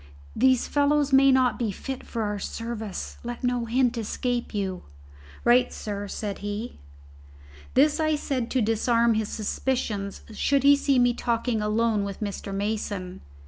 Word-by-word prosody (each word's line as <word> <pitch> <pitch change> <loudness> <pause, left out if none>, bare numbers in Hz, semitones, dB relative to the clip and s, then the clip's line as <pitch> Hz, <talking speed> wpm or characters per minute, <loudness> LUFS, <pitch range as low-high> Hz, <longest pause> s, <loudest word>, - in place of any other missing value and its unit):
These 260 +1 +3
fellows 290 -1 +2
may 270 0 +7
not 260 -1 +3
be 230 -4 0
fit 265 +6 -6
for 230 -2 -3
our 205 -1 -2
service. 220 -1 -5
Let 240 +1 -6
no 245 -1 0
hint 245 0 +1
escape 240 +2 -2
you." 195 -3 -3 0.6
"Right, 245 +1 +4
sir," 205 -1 -5
said 200 0 -4
he. 205 +4 -5 1.0
This 300 +3 +4
I 310 -1 +2
said 265 -5 -2
to 260 - +1
disarm 230 +2 +2
his 220 -1 -1
suspicions 215 -3 -2
should 275 +4 +1
he 285 0 +7
see 280 -1 +1
me 245 -1 +4
talking 235 -1 -1
alone 215 0 +1
with 200 -1 -5
Mr. 200 -1 -4
Mason. 200 -2 -3
235 Hz, 150 wpm, -26 LUFS, 210-260 Hz, 1.0 s, may